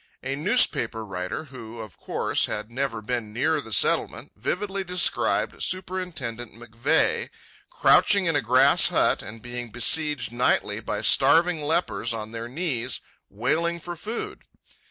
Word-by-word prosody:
A 135 +1 -3
newspaper 140 - +2
writer, 90 +6 -5
who, 120 -5 -11
of 110 -3 -9
course, - - 0
had 105 +2 -5
never 120 -3 -3
been 115 -2 -3
near 150 +7 0
the 115 - -12
Settlement, - - +1
vividly 195 0 -3
described 180 -1 +1
Superintendent 165 - -3
McVeigh, 130 - 0 0.4
crouching 205 - +4
in 165 -3 +1
a 145 - +2
grass 130 +4 +5
hut - - +1
and 110 +3 -10
being 120 -1 -6
besieged 130 +2 +2
nightly 120 +1 0
by - - -4
starving 170 0 +4
lepers 145 -6 -1
on 110 0 -6
their 115 0 -6
knees, 130 -4 -2 0.3
wailing 160 - -1
for 175 +1 -7
food. 215 +8 -6
130 Hz, 135 wpm, -24 LUFS, 115-170 Hz, 0.4 s, grass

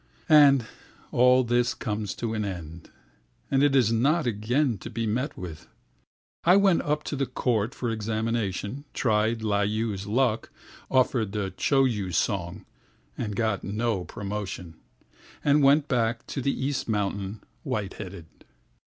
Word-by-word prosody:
And 140 -5 +7 0.5
all 125 +1 +5
this 120 +1 +1
comes 105 -3 -3
to 115 -2 -3
an 110 -1 -1
end, 85 -4 -7 0.6
And 135 0 +3
is 135 -6 +4
not 145 +8 +2
again 120 +2 0
to 115 - -8
be 115 0 -3
met 125 +7 -2
with.I 90 - -4
went 195 -3 +4
up 150 +1 -1
to - - -4
the 135 -1 -1
court 120 -2 -1
for 120 -2 -2
examination, 110 +2 -2
Tried 110 -1 +1
Layu's 105 -1 -1
luck, 115 0 +1 0.4
offered 125 -5 +2
the 100 -3 -2
Choyu 120 -9 +1
song, 90 0 -1 0.5
And 105 - -4
got 110 -3 0
no 105 -1 -1
promotion, 100 -4 -5 0.7
And 145 0 +4
went 140 +2 +5
back 120 -2 0
to 135 - -4
the 135 0 -1
East 135 -4 -2
Mountains 100 -1 -2 0.2
white 100 -3 -3
headed. 95 -4 -8
115 Hz, 135 wpm, -26 LUFS, 100-130 Hz, 0.7 s, And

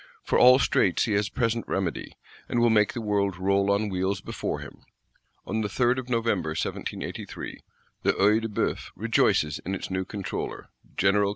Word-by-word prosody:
For - - +1
all 125 +1 +8
straits 100 -8 +2
he 115 - -2
has 100 -1 +1
present 115 +2 0
remedy, 95 -4 -2 0.4
and 120 - +1
will 120 -1 +4
make 105 -2 +3
the 120 - -4
world 100 -3 0
roll 100 +1 +2
on 100 +2 +2
wheels 95 0 -1
before - - -4
him. - - -10 0.7
On 110 +2 -1
the 105 - -1
3d 120 +5 +1
of 130 -1 -8
November 105 -10 0
1783, - - -5 0.4
the - - +2
Œil 105 +3 +3
de 115 - -2
Bœuf 105 - -2
rejoices 75 -1 +2
in 95 +2 -4
its 95 - -6
new 95 0 -1
Controller 100 0 -5 0.3
General. 100 +1 +3
100 Hz, 175 wpm, -26 LUFS, 95-115 Hz, 0.7 s, all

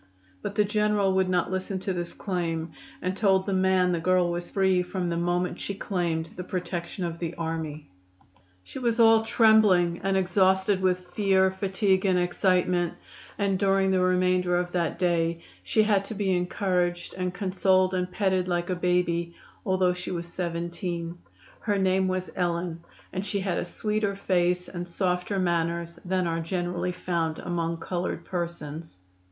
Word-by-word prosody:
But 200 - -5
the 210 - +3
General 210 -2 +2
would 190 -1 +2
not 180 -1 +1
listen 190 +1 -2
to 190 - -2
this 175 -1 -4
claim, 165 -4 -2 0.3
and 185 +1 -1
told 190 -2 +3
the 200 - -1
man 185 -1 +3
the 170 - 0
girl 180 +1 +2
was 175 0 -4
free 190 -2 +2
from 180 0 -3
the 170 - -1
moment 175 +1 -1
she 200 - -4
claimed 170 -5 -2
the 180 - -5
protection 180 0 -4
of 170 -1 -5
the 170 0 -4
army. 160 -2 -4 0.8
She 180 - -8
was 235 -2 0
all 225 -1 +7
trembling 215 -6 +4
and 195 0 +2
exhausted 190 +1 +2
with 180 -1 0
fear, 190 -1 +3
fatigue 190 0 +1
and 190 -2 +3
excitement, 180 -1 +1 0.4
and 195 -2 0
during 195 0 +3
the 190 - +3
remainder 180 -1 +2
of 175 0 -2
that 170 -2 -1
day 170 -2 0 0.2
she 215 - +2
had 205 -2 +2
to 220 - -6
be 195 -2 +1
encouraged 180 -1 -1
and 180 -1 -2
consoled 185 0 +2
and 180 0 -1
petted 190 -2 +1
like 175 0 -1
a - - +1
baby, 175 -1 0 0.3
although 185 -1 +3
she 180 0 -7
was 170 -1 -3
17. 170 0 -4 0.4
Her 205 -3 0
name 190 0 +2
was 185 0 -2
Ellen, 170 -2 -2 0.3
and 185 +1 -2
she 200 0 -2
had 190 -3 -1
a - - -2
sweeter 210 +2 -1
face 180 -2 +1
and 175 0 -6
softer 180 +2 -1
manners 170 -1 -1
than 185 0 0
are 165 -1 -1
generally 175 +1 -2
found 170 -3 -2
among 170 -1 -2
colored 175 -1 -3
persons. 165 - -5
180 Hz, 165 wpm, -27 LUFS, 175-190 Hz, 0.8 s, all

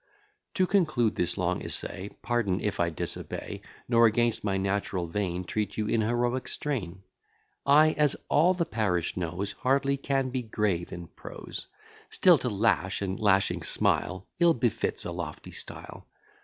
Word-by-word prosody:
To 185 - +3
conclude 155 - +2
this 90 - +1
long - - 0
essay; 95 +2 -2
Pardon 110 -6 +1
if 105 -2 -2
I 85 -1 +2
disobey, 80 - -5 0.3
Nor 115 -1 +6
against 115 +1 +1
my 100 -2 0
natural 95 -2 -1
vein, 90 0 -2
Treat 105 +2 -3
you 110 - 0
in 110 +1 +1
heroic 120 +3 0
strain. 95 -11 -3 0.6
I, 155 +2 +7
as 150 -2 +2
all 175 +5 +4
the 170 -2 0
parish 100 - -1
knows, 90 +3 -3
Hardly 140 +1 +1
can 135 -1 -1
be 130 0 -1
grave 105 -6 -1
in 85 0 -6
prose: - - -8 0.4
Still 180 -5 +5
to 125 - -1
lash, 100 -2 +1
and 95 -1 -3
lashing 100 -2 +2
smile, 95 +1 0
Ill 170 -2 +5
befits 120 -2 -1
a - - -3
lofty - - -6
style. - - -7
110 Hz, 155 wpm, -28 LUFS, 95-135 Hz, 0.6 s, I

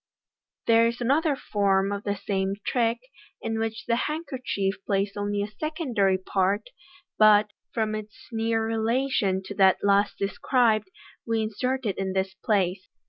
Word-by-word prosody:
There 230 0 +5
is 235 +1 -3
another 285 +5 +2
form 195 -4 +1
of 200 0 -4
the 205 0 0
same 195 0 -1
trick, 235 -2 +1 0.4
in 225 0 -3
which 225 0 -3
the 235 0 +1
handkerchief 255 - -3
plays 200 0 +1
only 205 0 -1
a - - -3
secondary 240 - 0
part, 195 - -1 0.5
but, 210 -1 +6 0.2
from 220 -2 -1
its 215 -1 -6
near 225 0 0
rela 225 +4 0
tion 190 -6 +1
to 190 - -7
that 190 -2 +4
last 200 0 +3
described, 215 +1 +1 0.4
we 225 -1 +1
insert 250 +4 -2
it 195 -3 -1
in 190 -1 -2
this 190 0 -1
place. 190 -2 -1
215 Hz, 150 wpm, -26 LUFS, 195-230 Hz, 0.5 s, but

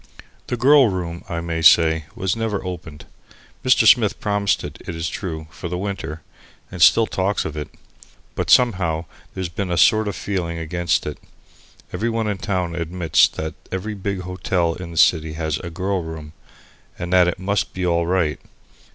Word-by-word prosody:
The 125 - -2
"girl 135 +2 +6
room," 85 -3 -4
I 85 -2 -3
may 85 -1 -3
say, 80 -1 +5
was 95 +1 -1
never 110 -4 -2
opened. 80 -4 -7 0.6
Mr. 125 -3 +4
Smith 110 -1 +5
promised 100 -2 0
it, - - -8
it 85 - -4
is 80 +1 -3
true, 80 -5 -5
for 80 +3 -7
the 90 - -3
winter, 90 -5 -5 0.5
and 90 - -7
still 115 +6 +6
talks 95 -1 -1
of 75 - -5
it. 75 -1 -5 0.6
But - - -3
somehow 90 -9 +3 0.3
there's 95 -1 -3
been 90 +3 -4
a 85 - -1
sort 110 +7 +4
of 100 - -3
feeling 85 -4 -3
against 85 0 -1
it. 75 - -5 0.7
Every 110 +6 -1
one 115 -1 -1
in 100 -2 -2
town 95 -6 -2
admits 85 -1 +2
that 80 0 -5 0.2
every 95 +3 -3
big 100 -1 -3
hotel 90 -2 -1
in 90 0 -8
the 85 - -9
city 80 0 +3
has 80 -1 -2
a 85 - -6
"girl 95 +2 -2
room" 80 -2 -8 0.6
and 85 +1 -4
that 90 -1 +6
it 90 - -1
must 100 +1 -1
be 90 0 -3
all 85 -1 +1
right. 85 -5 0
90 Hz, 180 wpm, -21 LUFS, 80-100 Hz, 0.7 s, girl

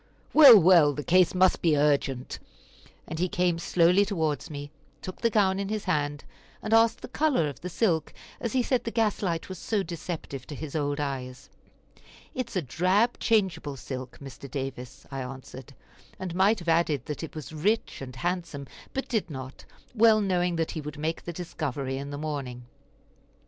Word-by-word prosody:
"Well, 275 -7 +11
well, 165 -4 +6
the 145 - -5
case 180 +2 +4
must 185 0 +4
be 160 -3 +3
urgent," 140 -3 0 0.7
and 160 - -5
he 180 +1 +1
came 175 -1 +1
slowly 180 +3 +4
towards 160 -8 -2
me, 145 -1 -7 0.3
took 185 - -8
the 230 - +3
gown 195 -3 +2
in 200 0 -3
his 215 -1 -2
hand, 145 -5 -1 0.4
and 215 - -1
asked 225 0 +4
the - - -7
color 265 - +1
of 140 -2 -7
the 180 - -5
silk, 170 -4 0 0.3
as 235 - -3
he 255 -1 +2
said 255 0 0
the - - -3
gas 225 -3 0
light 170 -5 -2
was 185 -2 -7
so 210 -3 -1
deceptive 160 -6 -6
to 150 - -7
his 150 0 -7
old 145 -1 -1
eyes. 135 -1 -5 0.8
"It 255 -2 -3
is - - -11
a 185 - 0
drab 185 - +1
changeable 180 -10 0
silk, 130 -1 -7
Mr. 140 0 -10
Davis," 135 0 -6
I 135 -1 -4
answered; 130 +1 -9 0.4
and 185 -2 -5
might 195 +5 +3
have 175 -3 -10
added 160 -6 +2
that 150 - -5
it 160 - -7
was 155 0 -7
rich 205 +6 -1
and 130 -2 -8
handsome, 170 -3 -3 0.3
but 270 - -2
did 220 -7 -1
not, 130 -2 -8 0.3
well 225 -2 +5
knowing 180 -3 +1
that 165 -1 -1
he 155 - -5
would 150 0 -7
make 160 +2 -3
the 175 - -4
discovery 140 -6 -4
in 140 +1 -6
the 145 - -5
morning. 140 -5 -5
165 Hz, 185 wpm, -27 LUFS, 140-190 Hz, 0.8 s, Well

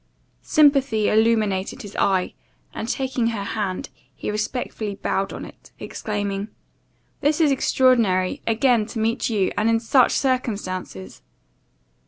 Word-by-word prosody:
Sympathy 275 -8 +3
illuminated 215 -3 +1
his 205 -1 -10
eye, 190 -2 +1 0.4
and, 220 - -5
taking 260 -3 -1
her 225 -3 -2
hand, 200 -3 -3 0.3
he - - -4
respectfully 215 -1 -3
bowed 195 0 -2
on - - -7
it, - - -15
exclaiming 205 -1 -4 0.7
"This 295 +2 +1
is 310 -3 +4
extraordinary! 230 -9 +2
again 230 -1 +2
to 230 - -6
meet 225 +4 0
you, 205 -4 +1
and 225 - +1
in 225 0 +3
such 245 +2 +3
circumstances!" 200 - -2
220 Hz, 125 wpm, -22 LUFS, 200-250 Hz, 0.7 s, is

